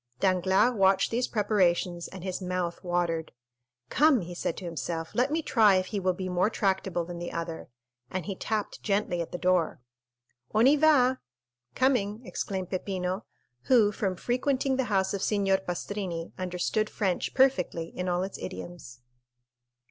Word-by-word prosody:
Danglars 190 - +3
watched 195 -2 +3
these 240 +2 0
preparations 180 -5 +1
and 190 -2 -10
his 185 0 -3
mouth 180 -2 -3
watered. 175 -2 -1 0.6
"Come," 295 -5 +4
he 175 0 -7
said 170 - -3
to 185 - -7
himself, 165 0 -4
"let 250 +3 +2
me 320 +1 0
try 215 -8 +5
if 185 0 +1
he 205 - 0
will 185 -1 0
be 185 0 -4
more 180 +3 +2
tractable 190 -5 0
than 175 0 -7
the 175 - -5
other;" 165 -3 -5 0.4
and 185 +3 -4
he 195 - -4
tapped 215 +2 -3
gently 200 -4 0
at 165 - -6
the - - -4
door. 180 -2 +1 0.8
"On 220 +2 +5
y 280 +3 +7
va," 280 -4 +4 0.6
(coming) 240 -3 +1
exclaimed 190 -5 -4
Peppino, 185 +1 -2 0.4
who 225 -5 +5
from 195 -3 -2
frequenting 260 +5 0
the 265 -1 0
house 195 -4 +1
of 200 - -2
Signor 195 -2 +2
Pastrini 175 -2 -4
understood 185 +4 -1
French 190 -4 -1
perfectly 180 -11 +2
in 180 0 -4
all 175 +1 +1
its 195 - -6
idioms. 170 -9 -8
190 Hz, 160 wpm, -28 LUFS, 175-215 Hz, 0.8 s, y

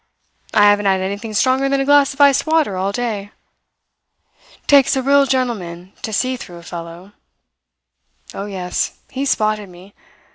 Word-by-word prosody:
I 210 - +4
haven't 205 0 +4
had 190 -1 +2
anything 200 +3 -5
stronger 260 +4 +2
than 275 0 +1
a 270 - 0
glass 285 -1 +4
of 285 - -2
iced 280 +1 +4
water 310 -10 +1
all 190 +2 -1
day. 215 -3 -3 1.4
Takes 280 -2 +5
a 265 - -1
real 280 +1 +4
gentleman 200 -9 -3
to 220 - -5
see 255 +4 -1
through 175 -7 -10
a 170 - -13
fellow. 170 +3 -9 1.2
Oh, 200 - -6
yes 185 -3 -3
he 270 +1 -3
spotted 215 -5 0
me. 180 +3 -15
215 Hz, 155 wpm, -18 LUFS, 190-270 Hz, 1.4 s, Takes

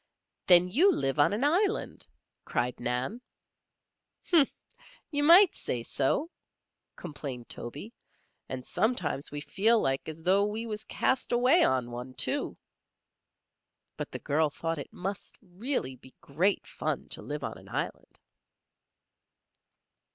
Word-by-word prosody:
"Then 180 0 +7
you 315 - +4
live 135 - -1
on 145 - +5
an 210 +6 -1
island," 385 +9 0 0.4
cried 125 0 -2
Nan. 125 - -2 1.1
"Huh! 325 -5 +7 0.7
Ye 290 -1 +1
might 345 +5 +8
say 120 -2 -3
so," 280 - 0 0.6
complained 140 -7 -7
Toby. 150 - -6 0.6
"And 130 -1 -5
sometimes 180 - -1
we 145 0 -5
feel 205 +10 +3
like 135 -1 -1
as 160 +1 -8
though 190 +3 +4
we 215 +3 -2
was 215 -1 -5
cast 260 - 0
away 250 +8 +5
on 125 -2 +1
one, 125 +2 -7
too." - - -1 1.4
But - - -5
the - - -5
girl 150 +2 +1
thought 165 +2 -3
it 140 - -8
must 195 +2 -5
really 185 - -3
be 130 +1 -17
great 175 +8 0
fun - - -3
to - - -4
live - - -5
on - - -5
an - - -16
island. - - -5
180 Hz, 130 wpm, -29 LUFS, -, 1.4 s, might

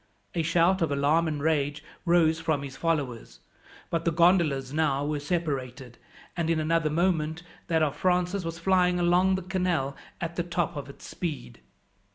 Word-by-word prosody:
A 170 - 0
shout 170 +3 +2
of 160 -3 +1
alarm 145 +4 +2
and 150 -2 -3
rage 150 -1 0 0.2
rose 165 -2 +3
from 160 -3 -1
his 135 -1 -7
followers, 135 - -2 0.5
but 165 -1 0
the 170 - +1
gondolas 165 -6 +3
were 150 - -4
now 150 -1 +1
separated, 135 -6 -3 0.4
and 170 -2 -1
in 165 -1 +2
another 160 0 +1
moment 160 0 0 0.2
that 160 -2 +2
of 145 -2 0
Francis 180 +3 +1
was 165 0 -4
flying 180 0 +2
along 180 +2 +3
the 190 - -3
canal 180 -7 -1 0.2
at 170 0 -5
the 175 - +1
top 175 0 -2
of 140 -1 -6
its 140 - -12
speed. 145 - -5
165 Hz, 170 wpm, -27 LUFS, 145-175 Hz, 0.5 s, rose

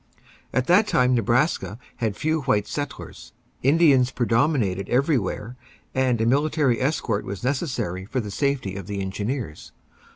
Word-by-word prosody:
At 130 - 0
that 195 +7 +4
time 125 -6 +3
Nebraska 120 0 +1 0.2
had 110 -4 -1
few 155 +3 0
white 105 -7 +1
settlers; 145 -1 -6 0.3
Indians 140 -3 +4
predominated 115 - 0
everywhere, 125 - 0 0.4
and 130 -3 +1
a 110 - +1
military 140 -1 +2
escort 130 -6 0
was 100 +2 -6
necessary 125 - -2
for 130 +6 -2
the 105 -4 -5
safety 135 -6 -1
of 100 -2 -7
the 100 -1 -4
engineers. 100 - -4
125 Hz, 135 wpm, -24 LUFS, 105-140 Hz, 0.4 s, that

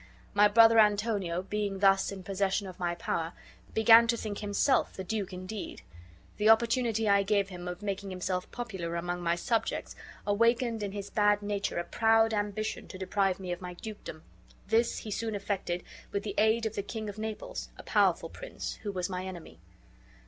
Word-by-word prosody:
My 205 0 +6
brother 225 +2 +7
Antonio, 205 -4 +2
being 205 0 -2
thus 195 0 +4
in 195 -2 -7
possession 195 +1 0
of 185 -1 -9
my 175 -1 -1
power, 165 -1 -2 0.4
began 225 +1 +7
to 235 0 +2
think 210 -2 -4
himself 210 +6 +1
the 190 - -6
duke 200 0 -3
indeed. 185 +3 -7 0.5
The 215 +1 +3
opportunity 230 -1 +3
I 200 -1 +5
gave 200 0 +1
him 180 -1 -7
of 180 +3 -6
making 200 -1 -3
himself 185 0 -3
popular 190 -9 -4
among 175 +1 -3
my 170 0 +1
subjects 225 +6 -1 0.3
awakened 230 +2 +2
in 200 -1 -3
his 200 0 -6
bad 205 -1 +3
nature 205 -2 -2
a 175 - 0
proud 225 +2 +3
ambition 210 +1 -2
to 185 - -9
deprive 190 0 0
me 185 -2 -5
of 175 - -4
my 180 -1 -7
dukedom; 205 -6 -8 0.4
this 225 +3 +2
he 215 - -6
soon 220 +1 -2
effected 195 -3 -2 0.3
with 200 - -2
the 205 - -4
aid 220 +2 +3
of 220 - -2
the 200 - -2
King 215 +2 -5
of 205 +1 -7
Naples, 220 0 -5
a - - -10
powerful - - +2
prince, - - -7
who 210 - -3
was 180 -2 -2
my 185 -1 -4
enemy." 170 - -9
205 Hz, 185 wpm, -30 LUFS, 185-220 Hz, 0.5 s, brother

